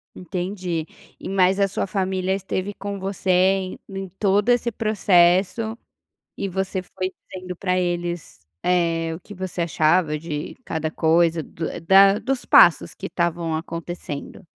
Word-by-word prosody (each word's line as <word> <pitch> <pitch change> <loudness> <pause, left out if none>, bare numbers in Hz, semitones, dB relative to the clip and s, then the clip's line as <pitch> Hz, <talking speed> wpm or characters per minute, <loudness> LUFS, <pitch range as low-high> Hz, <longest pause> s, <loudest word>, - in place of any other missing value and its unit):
Entendi, 180 -3 -4 0.3
e - - -7
mais 190 0 +3
a 200 - +4
sua 195 - -2
família 190 -1 -1
esteve 195 +1 -3
com 200 0 -6
você 190 0 -4
em 185 +1 +2
em 195 -1 -6
todo 205 +2 +2
esse 240 -1 +2
processo, 205 +1 +2 0.6
e 200 - -2
você 190 0 -2
foi 185 +1 -4 0.2
dizendo 185 -1 -6
pra 185 +1 0
eles, 175 - -3 0.2
eh, 165 -2 +1
o - - -9
que 205 - -12
você 185 -2 -4
achava 155 -1 +2
de 150 -2 -5
cada 160 -5 -3
coisa, 165 +1 +2
do 160 +1 -6 0.2
da 195 +4 +6
dos 265 +1 -2
passos 170 - +6
que - - -6
estavam 170 -2 -1
acontecendo. 165 -2 -6
185 Hz, 145 wpm, -23 LUFS, 170-195 Hz, 0.6 s, da